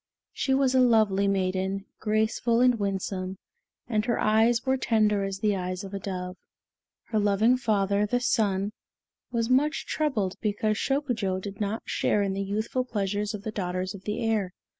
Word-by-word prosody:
She 265 - +1
was 265 -1 +2
a 260 - +4
lovely 215 -5 +4
maiden, 190 0 -1
graceful 220 +2 +1
and 250 -2 +4
winsome, 190 -1 -2 0.5
and 215 -3 +1
her 235 - +1
eyes 225 +3 +3
were 265 0 +2
tender 215 -5 +2
as 195 0 -3
the 210 -2 +2
eyes 185 0 -3
of 195 0 -8
a 200 - -3
dove. 180 -1 -5 0.7
Her 220 - +1
loving 210 +4 +3
father, 205 -4 +1
the 245 +4 +1
Sun, 205 -4 +1 0.6
was 230 -1 0
much 275 +5 +2
troubled 215 -12 -1
because 215 0 0
Shokujo 240 -10 -1
did 200 +2 -7
not 210 +2 -2
share 205 - +1
in 195 -1 -1
the 195 - -2
youthful 215 +6 -1
pleasures 210 -2 -2
of 200 - -9
the 220 - -3
daughters 185 -1 -3
of 200 -1 -11
the 220 +3 -2
air. 210 -5 0
210 Hz, 170 wpm, -27 LUFS, 195-230 Hz, 0.7 s, a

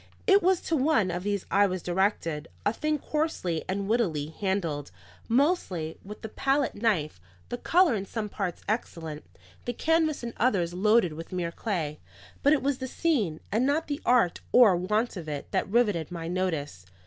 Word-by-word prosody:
It 400 -1 +6
was 370 -1 +3
to 325 - -1
one 260 - +2
of 175 - -3
these 200 0 -2
I 200 +1 +5
was 185 -2 -4
directed; 175 -4 0 0.2
a 205 - +2
thing 305 +4 0
coarsely 295 - -2
and 195 +1 -1
wittily 175 -10 0
handled, 165 -5 -2 0.4
mostly 230 - +1
with 210 +2 -10
the 220 - -5
palette 275 +4 +1
knife, 185 - 0 0.3
the 245 - -3
colour 350 -1 +4
in 195 -3 -3
some 220 0 -3
parts 195 -4 -4
excellent, 165 -8 -3 0.4
the 245 - -2
canvas 315 +1 +1
in 235 -1 -4
others 190 -8 +1
loaded 210 -1 +3
with 165 +4 -8
mere 175 -2 -2
clay. 165 -7 -3 0.4
But 285 - +5
it 300 - +1
was 275 -1 0
the 260 - -3
scene, 235 - 0
and 220 +5 +2
not 290 +4 +1
the 290 -1 -4
art 240 -8 +3
or 230 -7 +7
want 210 +5 0
of 160 -3 -6
it, 145 -1 -5
that - - 0
riveted 205 -8 +2
my 165 -2 -5
notice. 160 - -2
205 Hz, 180 wpm, -28 LUFS, 170-250 Hz, 0.4 s, or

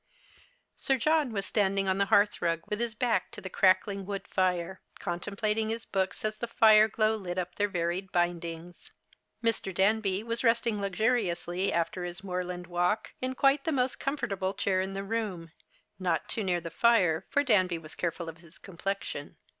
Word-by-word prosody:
Sir 270 - +1
John 305 +1 +2
was 200 -3 -2
standing 195 -2 +1
on 190 +1 +1
the 200 - +2
hearth 205 +2 +3
rug 165 -1 0
with 210 - -2
his 235 -2 -2
back 240 +1 0
to - - -7
the 190 -2 -8
crackling 195 +1 +3
wood 195 0 -5
fire, 185 -1 0 0.2
contemplating 210 +4 -2
his 225 0 -3
books 190 +2 -2
as 215 0 -1
the 235 - -4
fire 220 -2 +6
glow 220 0 +1
lit 185 -4 -5
up 180 -1 -2
their 205 - +1
varied 180 0 -2
bindings. 175 -1 -3 0.5
]Mr. 230 -4 +1
Danby 195 +1 +2
w 230 +1 -8
as 230 - -1
resting 230 -3 +2
luxuriously 195 -3 0
alter 170 +2 -1
his 175 +2 -5
moorland 180 -1 -4
walk, 180 +5 0
in 260 0 -2
quite 275 +1 +3
the 325 - 0
most 255 -3 0
comfortable 215 -9 -2
chair 185 -2 +1
in 190 +1 -4
the 195 - -3
room, 200 -6 -3 0.5
not 175 -5 0
too 220 - -2
near 180 -2 +1
the 165 -1 -7
fire, 185 -6 +3
for 285 - +2
Danby 185 -9 +3
was 155 -1 -10
careful 170 0 -3
of 165 0 -7
his 170 0 -14
complexion. 195 +2 -5
195 Hz, 180 wpm, -29 LUFS, 175-220 Hz, 0.5 s, fire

